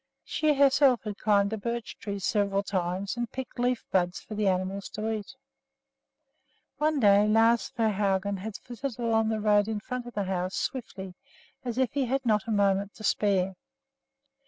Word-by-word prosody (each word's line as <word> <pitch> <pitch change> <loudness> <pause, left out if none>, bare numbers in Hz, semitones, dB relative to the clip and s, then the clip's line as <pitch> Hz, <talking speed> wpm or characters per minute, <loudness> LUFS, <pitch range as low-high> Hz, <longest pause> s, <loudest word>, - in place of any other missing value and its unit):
She 305 -2 +1
herself 275 -2 +4
had 210 -2 -6
climbed 205 -1 +2
a 220 - -3
birch 235 +2 -4
tree 200 -1 -4
several 200 0 0
times 190 +1 -2
and 240 -2 -3
picked 260 -1 -7
leaf 245 0 0
buds 180 -1 +1
for 220 - -10
the 210 -1 0
animals 190 +1 -1
to 215 +1 -2
eat. 215 +3 -5 1.4
One 305 -1 +2
day 205 -2 +5
Lars 225 +2 +3
Svehaugen 200 -4 0
had 205 +2 -6
flitted 245 +1 -6
along 225 -2 +1
the 220 -1 -1
road 210 -1 +3
in 220 -1 -2
front 250 +2 -5
of 240 - -10
the 205 - 0
house, 185 -1 -2
swiftly, 195 -7 -4 0.5
as 240 -2 -4
if 260 -2 +1
he 280 -2 +1
had 265 +2 -1
not 215 -3 +2
a - - -2
moment 200 -1 +1
to 215 - -11
spare. 195 -3 +1
215 Hz, 175 wpm, -28 LUFS, 200-240 Hz, 1.4 s, day